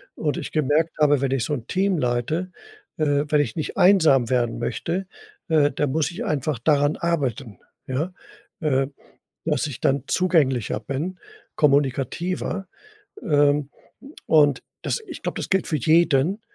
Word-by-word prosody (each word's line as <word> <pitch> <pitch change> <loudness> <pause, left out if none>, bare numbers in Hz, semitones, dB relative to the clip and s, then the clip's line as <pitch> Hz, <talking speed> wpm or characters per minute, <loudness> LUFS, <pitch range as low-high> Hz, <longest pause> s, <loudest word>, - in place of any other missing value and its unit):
und 150 -2 -2
ich - - -5
gemerkt 155 +2 +1
habe, 145 -2 +4
wenn 135 -1 0
ich 135 -4 0
so - - -2
'n 120 -5 -5
Team 190 0 +1
leite 140 +8 -1 0.5
äh, 145 -2 +1
wenn 150 -1 +4
ich 125 -6 -3
nicht 155 - -4
einsam 160 - +5
werden 120 -2 0
möchte, 175 +9 -3 0.4
äh, 150 -4 +3
dann 145 0 -1
muss 155 +2 0
ich 210 +8 -5
einfach 150 - -1
daran 145 +3 +2
arbeiten, 135 - -2 0.3
ja? 150 +8 -2 0.5
Äh, 135 -4 +1 0.6
dass - - 0
ich 140 -5 -8
dann 135 -1 +1
zugänglicher 140 - +1
bin, 140 - -4 0.4
kommunikativer. 150 +7 0 0.6
Ähm, 145 -1 +2 0.6
und 145 -4 +4 0.2
das - - -1
ich - - -8
glaube, - - -3
das - - -5
gilt 190 -1 +1
für 155 - -1
jeden, 165 - +3
145 Hz, 150 wpm, -23 LUFS, 135-165 Hz, 0.6 s, einsam